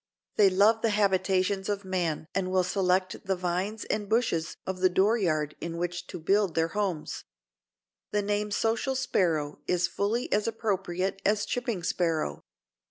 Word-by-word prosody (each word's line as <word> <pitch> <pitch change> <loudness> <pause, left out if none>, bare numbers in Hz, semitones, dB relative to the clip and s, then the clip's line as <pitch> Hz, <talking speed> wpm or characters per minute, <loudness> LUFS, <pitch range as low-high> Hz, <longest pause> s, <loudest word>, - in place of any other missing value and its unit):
They 205 -2 +6
love 205 +4 +4
the 225 - +2
habitations 190 -1 +1
of 200 -1 -2
man 175 -5 -1
and 185 -1 -1
will 185 0 +2
select 185 +1 0
the 190 -2 0
vines 185 +4 -2
and 210 -1 -2
bushes 220 -8 0
of 185 -1 -3
the 185 0 +4
door 195 +5 +3
yard 155 -8 0
in 170 0 -4
which 175 +1 -3
to - - -7
build 195 +1 +2
their 165 0 +2
homes. 190 -5 -3 0.8
The 210 0 0
name 205 +1 0
Social 225 +5 0
Sparrow 160 - 0
is 180 -1 +2
fully 215 +5 -1
as 210 +1 +1
appropriate 195 -4 -2
as 205 0 +2
Chipping 240 -7 -2
Sparrow. 165 - -1
190 Hz, 160 wpm, -28 LUFS, 175-210 Hz, 0.8 s, They